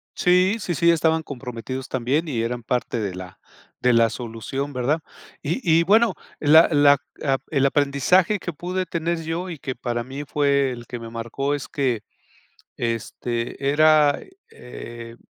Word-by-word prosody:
Sí, 185 Hz, +3 st, +3 dB
sí, 175 Hz, -4 st, -3 dB
sí, 170 Hz, +2 st, +4 dB
estaban 160 Hz, 0 st, +2 dB
comprometidos 130 Hz, -1 st, -6 dB
también. 135 Hz, +6 st, 0 dB
Y 120 Hz, -7 st, -1 dB
eran 120 Hz, +1 st, -2 dB
parte 120 Hz, 0 st, -1 dB
de 100 Hz, -4 st, -3 dB
la 90 Hz, 0 st, -9 dB, 0.4 s
de 125 Hz, -, +3 dB
la 115 Hz, -1 st, +4 dB
solución, 120 Hz, +5 st, -5 dB
¿verdad? 135 Hz, +5 st, 0 dB, 0.4 s
Y 160 Hz, -, -2 dB, 0.2 s
y -, -, +3 dB
bueno, 220 Hz, +3 st, +4 dB, 0.3 s
la 160 Hz, +2 st, +7 dB
la 145 Hz, -1 st, +6 dB, 0.3 s
a 135 Hz, -2 st, +2 dB
el 140 Hz, -3 st, +2 dB
aprendizaje 145 Hz, +8 st, +3 dB
que 175 Hz, -, -5 dB
pude 180 Hz, +4 st, -3 dB
tener 170 Hz, 0 st, -2 dB
yo, 170 Hz, +3 st, -3 dB
y 165 Hz, -, -6 dB
que 130 Hz, -1 st, -5 dB
para 120 Hz, -1 st, -3 dB
mí 135 Hz, +4 st, -7 dB
fue 140 Hz, -1 st, +1 dB
el 120 Hz, -1 st, -8 dB
que 120 Hz, 0 st, -7 dB
me 115 Hz, 0 st, -8 dB
marcó, 120 Hz, +5 st, -3 dB
es 140 Hz, -, -6 dB
que 130 Hz, -6 st, -1 dB, 0.8 s
este, 120 Hz, +3 st, -3 dB
era, 155 Hz, -1 st, +4 dB, 0.3 s
eh, 120 Hz, -1 st, -10 dB
140 Hz, 160 wpm, -23 LUFS, 120-160 Hz, 0.8 s, la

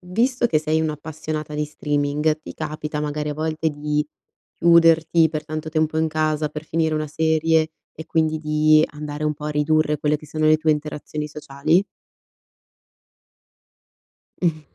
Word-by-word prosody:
visto 240 Hz, +6 st, +1 dB
che 155 Hz, -, +2 dB
sei 155 Hz, +1 st, 0 dB
un'appassionata 155 Hz, 0 st, -4 dB
di 150 Hz, -, 0 dB
streaming, 150 Hz, +1 st, -1 dB
ti -, -, -9 dB
capita 150 Hz, -1 st, -4 dB
magari 150 Hz, 0 st, -2 dB
a 150 Hz, -, -3 dB
volte 160 Hz, +1 st, -1 dB
di 150 Hz, 0 st, -1 dB, 0.5 s
chiuderti 165 Hz, -1 st, +5 dB
per 155 Hz, -1 st, -4 dB
tanto 155 Hz, +1 st, -5 dB
tempo 155 Hz, 0 st, 0 dB
in 160 Hz, -, +2 dB
casa 155 Hz, -1 st, 0 dB
per 150 Hz, +1 st, -7 dB
finire 160 Hz, 0 st, 0 dB
una 155 Hz, 0 st, -1 dB
serie 160 Hz, +1 st, +2 dB, 0.3 s
e 160 Hz, -, -6 dB
quindi 160 Hz, -1 st, +1 dB
di 155 Hz, 0 st, +4 dB
andare 150 Hz, 0 st, -5 dB
un 150 Hz, -, +1 dB
po' 150 Hz, -, -10 dB
a 150 Hz, -, -2 dB
ridurre 150 Hz, +1 st, +2 dB
quelle 150 Hz, 0 st, +1 dB
che 155 Hz, -, -14 dB
sono 155 Hz, +1 st, -2 dB
le 155 Hz, 0 st, +6 dB
tue 155 Hz, 0 st, +2 dB
interazioni 150 Hz, 0 st, -3 dB
sociali? 150 Hz, +5 st, 0 dB, 2.6 s
Mh. 160 Hz, -3 st, +1 dB
155 Hz, 155 wpm, -22 LUFS, 150-160 Hz, 2.6 s, le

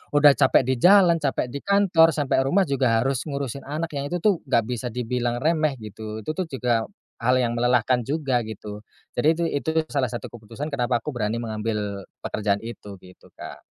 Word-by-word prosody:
udah 145 Hz, 0 st, +8 dB
capek 135 Hz, -, +4 dB
di 130 Hz, +1 st, 0 dB
jalan, 180 Hz, -2 st, +6 dB
capek 135 Hz, -4 st, -1 dB
di 140 Hz, -, -5 dB
kantor, 175 Hz, -5 st, +4 dB
sampe 145 Hz, -3 st, +1 dB
rumah 155 Hz, +9 st, +3 dB
juga 130 Hz, -7 st, +1 dB
harus 135 Hz, -1 st, 0 dB
ngurusin 140 Hz, -2 st, -5 dB
anak. 155 Hz, +3 st, -3 dB
Yang 140 Hz, -1 st, -3 dB
itu -, -, +1 dB
tuh, 210 Hz, -2 st, +5 dB
nggak 115 Hz, -, +3 dB
bisa 125 Hz, +2 st, -4 dB
dibilang 120 Hz, +1 st, -2 dB
remeh 155 Hz, -3 st, +1 dB
gitu. 110 Hz, -1 st, -8 dB
Itu 155 Hz, -, -2 dB
tuh 175 Hz, +2 st, -3 dB
juga, 125 Hz, -5 st, -1 dB, 0.4 s
hal 125 Hz, +2 st, +4 dB
yang 120 Hz, -1 st, 0 dB
melelahkan 125 Hz, 0 st, +2 dB
juga 135 Hz, -3 st, -1 dB
gitu. 105 Hz, -1 st, -8 dB, 0.3 s
Jadi 120 Hz, -, +1 dB
itu 170 Hz, +1 st, -1 dB
itu 145 Hz, +1 st, -2 dB, 0.2 s
salah 130 Hz, -4 st, -1 dB
satu 120 Hz, -, -5 dB
keputusan 115 Hz, +6 st, -8 dB
kenapa 125 Hz, -4 st, 0 dB
aku 145 Hz, +3 st, -6 dB
berani 110 Hz, 0 st, -1 dB
mengambil, 105 Hz, -3 st, -3 dB, 0.2 s
pekerjaan 100 Hz, -1 st, -1 dB
itu 105 Hz, -4 st, -9 dB
gitu 90 Hz, 0 st, -18 dB
Kak. -, -, -10 dB
125 Hz, 190 wpm, -24 LUFS, 115-145 Hz, 0.4 s, udah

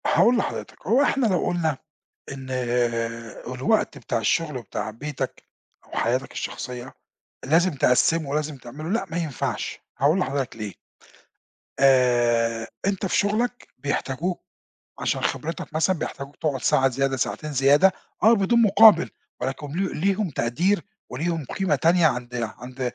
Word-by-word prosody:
هاقول 245 Hz, +1 st, +4 dB
لحضرتك، -, -, -4 dB
هو 255 Hz, +4 st, +4 dB
إحنا 275 Hz, -3 st, +2 dB
لو 185 Hz, -4 st, +1 dB
قُلنا 160 Hz, -5 st, 0 dB, 0.5 s
إن 135 Hz, -1 st, -8 dB, 1.1 s
الوقت 215 Hz, -, +1 dB
بتاع -, -, -2 dB
الشُّغل 165 Hz, -7 st, 0 dB
وبتاع 110 Hz, -2 st, -5 dB
بيتك 140 Hz, +5 st, -5 dB, 0.5 s
وحياتك 125 Hz, +3 st, 0 dB
الشخصية، 125 Hz, 0 st, -6 dB, 0.5 s
لازم 170 Hz, +6 st, +3 dB
تقسمُه 145 Hz, +4 st, +2 dB
ولازم 150 Hz, 0 st, -2 dB
تعملُه 135 Hz, +6 st, -8 dB
لأ، 215 Hz, +1 st, 0 dB
ما 165 Hz, -, -2 dB
ينفعش 155 Hz, -7 st, -3 dB, 0.2 s
هاقول 150 Hz, +7 st, +3 dB
لحضرتك 135 Hz, -5 st, -2 dB
ليه 105 Hz, -3 st, -6 dB, 1.1 s
آآ 120 Hz, -4 st, +3 dB, 0.2 s
أنت 195 Hz, 0 st, 0 dB
في 185 Hz, -, +1 dB
شُغلك 230 Hz, +5 st, 0 dB
بيحتاجوك 145 Hz, +5 st, -2 dB, 0.6 s
عشان -, -, -1 dB
خبرتك 165 Hz, 0 st, -3 dB
مثلًا، 165 Hz, +4 st, +2 dB
بيحتاجوك 140 Hz, -1 st, -6 dB
تقعُد 145 Hz, -5 st, -2 dB
ساعة 135 Hz, 0 st, +3 dB
زيادة 135 Hz, +1 st, 0 dB
ساعتين 155 Hz, +3 st, -2 dB
زيادة 145 Hz, +7 st, +5 dB, 0.3 s
آه، 220 Hz, +2 st, +7 dB
بدون 230 Hz, +2 st, +3 dB
مُقابل، 210 Hz, -4 st, +7 dB, 0.3 s
ولكن 135 Hz, +3 st, -3 dB
ل 190 Hz, +2 st, -2 dB
ليهم 195 Hz, +3 st, +1 dB
تقدير 160 Hz, +10 st, 0 dB, 0.3 s
وليهم 160 Hz, +3 st, -2 dB
قيمة 190 Hz, +7 st, 0 dB
تانية 170 Hz, 0 st, +4 dB
عند 125 Hz, -3 st, -3 dB, 0.2 s
عند 125 Hz, +2 st, -9 dB
150 Hz, 130 wpm, -24 LUFS, 130-185 Hz, 1.1 s, آه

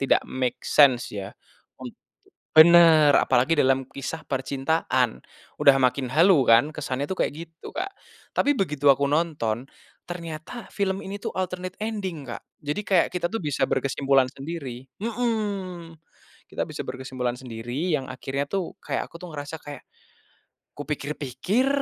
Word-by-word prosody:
tidak 135 Hz, -, +3 dB
make 130 Hz, -1 st, -2 dB
sense 130 Hz, -5 st, +5 dB
ya, 100 Hz, 0 st, -6 dB, 0.5 s
un -, -, -6 dB, 0.7 s
bener 160 Hz, -2 st, +8 dB
apalagi 140 Hz, +7 st, +3 dB
dalam 135 Hz, -1 st, +3 dB
kisah 155 Hz, +3 st, -5 dB
percintaan, 135 Hz, -, 0 dB, 0.4 s
udah 140 Hz, -, +7 dB
makin 130 Hz, +1 st, +2 dB
halu 165 Hz, -3 st, +5 dB
kan 115 Hz, +6 st, +6 dB
kesannya 140 Hz, -2 st, -3 dB
tuh 190 Hz, -, -3 dB
kayak -, -, -2 dB
gitu 165 Hz, 0 st, -12 dB
Kak, 375 Hz, +4 st, -3 dB, 0.4 s
tapi 290 Hz, +1 st, +3 dB
begitu 150 Hz, -, +1 dB
aku 140 Hz, +1 st, -1 dB
nonton, 145 Hz, -7 st, 0 dB, 0.4 s
ternyata 170 Hz, +6 st, -7 dB
film 195 Hz, -1 st, -1 dB
ini 195 Hz, +1 st, -5 dB
tuh -, -, -3 dB
alternate 185 Hz, 0 st, -4 dB
ending 195 Hz, -9 st, -4 dB
Kak, 120 Hz, -, -7 dB, 0.2 s
jadi 150 Hz, +7 st, -2 dB
kayak 185 Hz, -3 st, +3 dB
kita 180 Hz, -, -1 dB
tuh 225 Hz, -, -3 dB
bisa 145 Hz, -3 st, 0 dB
berkesimpulan 135 Hz, 0 st, +2 dB
sendiri, 135 Hz, -3 st, -7 dB, 0.2 s
mhm, 205 Hz, -7 st, -3 dB, 0.5 s
kita -, -, -2 dB
bisa -, -, -5 dB
berkesimpulan 130 Hz, -1 st, -3 dB
sendiri 125 Hz, +7 st, -3 dB
yang 135 Hz, -, -6 dB
akhirnya 135 Hz, +2 st, -3 dB
tuh 195 Hz, -3 st, -3 dB
kayak -, -, -2 dB
aku -, -, -11 dB
tuh 180 Hz, -, -8 dB
ngerasa 145 Hz, +2 st, -6 dB
kayak, 145 Hz, -2 st, -9 dB, 0.9 s
kupikir-pikir 150 Hz, -, -2 dB
150 Hz, 140 wpm, -25 LUFS, 135-180 Hz, 0.9 s, bener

